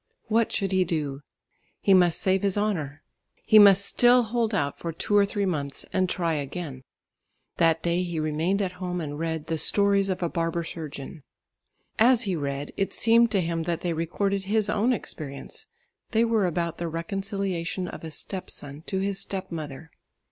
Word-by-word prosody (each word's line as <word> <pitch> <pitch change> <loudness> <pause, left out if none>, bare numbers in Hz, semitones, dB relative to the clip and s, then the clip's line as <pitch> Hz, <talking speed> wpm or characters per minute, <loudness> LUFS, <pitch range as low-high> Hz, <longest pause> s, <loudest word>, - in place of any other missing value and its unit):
What 225 +1 +2
should 195 -2 -1
he 190 -1 +3
do? 150 -5 -3 0.6
He 195 - +3
must 180 -3 +4
save 190 0 +2
his 200 0 0
honour. 160 -9 -2 0.4
He 215 - +7
must 200 -1 +7
still 245 +3 +5
hold 230 0 -1
out 145 -9 -1
for 170 - -4
two 185 +5 -1
or 200 -1 +5
three 200 -1 -1
months 145 -6 -2
and 185 -1 +1
try 170 -3 0
again. 145 -1 -5 0.8
That 165 -1 +3
day 170 +1 +1
he 175 -3 -3
remained 160 +6 0
at 185 - -2
home 180 -1 -2
and 150 -2 -5
read 160 -2 -3
The 160 -1 -2
Stories 200 +3 +3
of 185 -1 -2
a - - +2
Barber 165 0 -2
Surgeon. 155 -1 -7 0.8
As 240 +2 +5
he 195 -4 -1
read 140 -1 -4
it 195 - -1
seemed 230 +1 +4
to 200 -4 +1
him 165 -1 -2
that 170 - -1
they 175 -2 -1
recorded 195 +4 -1
his 210 +1 +2
own 215 +4 +2
experience; 145 - -5 0.4
they 225 0 +2
were 225 -4 +2
about 170 -1 -2
the 170 - -2
reconciliation 185 +1 -3
of - - -9
a 160 - -5
step 185 +5 0
son 145 +1 -5
to 190 - -2
his 195 0 0
step 195 -2 -4
mother. 155 -1 -7
180 Hz, 185 wpm, -26 LUFS, 160-200 Hz, 0.8 s, He